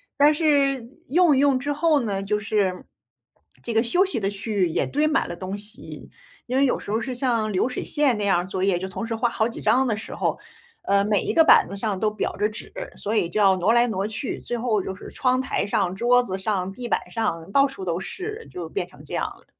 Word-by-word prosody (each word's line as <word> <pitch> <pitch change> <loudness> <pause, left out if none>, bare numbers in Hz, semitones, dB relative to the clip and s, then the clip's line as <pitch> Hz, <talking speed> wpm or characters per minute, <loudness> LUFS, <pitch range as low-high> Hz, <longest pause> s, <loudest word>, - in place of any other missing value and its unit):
但 290 +2 +5
是 285 -4 +2 0.3
用 335 +1 +4
一 - - +2
用 280 -2 +3
之 285 +3 -2
后 305 0 +3
呢， 200 -4 -2
就 210 +1 0
是 200 -3 -1 0.8
这 235 - -4
个 225 +1 +3
休 355 +11 +3
息 285 - -2
的 195 - 0
区 205 +2 -5
域 190 -4 +2
也 - - 0
堆 295 +2 +1
满 310 - +1
了 - - -5
东 185 +3 -5
西。 210 +2 -8 0.4
因 255 +2 -1
为 275 - +4
有 255 - +1
时 - - -7
候 220 - +1
是 250 +2 -4
像 235 -4 0
流 190 +7 +1
水 250 - -4
线 285 -6 +1
那 205 - -2
样 195 -3 +3
儿 175 - -3
作 185 0 -4
业， 195 -3 +2
就 185 - -4
同 225 +4 -5
时 225 - -2
画 235 +2 +1
好 220 -1 0
几 235 - -8
张 265 +1 +3
的 220 - +1
时 220 - -8
候， - - -1 0.4
呃， 200 0 +2
每 210 -1 +2
一 - - -1
个 330 - +6
板 - - +7
子 200 - -6
上 205 -1 -2
都 215 -1 +2
裱 215 - -3
着 210 - +1
纸， 220 +2 -9 0.3
所 210 +2 -3
以 190 -6 +1
就 215 - -2
要 195 -2 +5
挪 185 +4 +2
来 240 +1 +4
挪 195 -4 -2
去。 220 +5 -4
最 240 - -4
后 225 -3 0
就 190 - -5
是 190 - -10
窗 255 -1 +1
台 260 - -1
上、 195 -2 0
桌 245 +4 +4
子 190 -6 -4
上、 190 -2 -1
地 245 +4 -7
板 - - -1
上 170 -7 -2
到 275 0 +6
处 270 -9 -6
都 170 -2 -1
是， 420 - -6
就 175 -2 -6
变 170 - -3
成 180 - -17
这 - - -10
样 - - 0
了。 - - -10
220 Hz, 275 characters per minute, -24 LUFS, 195-260 Hz, 0.8 s, 板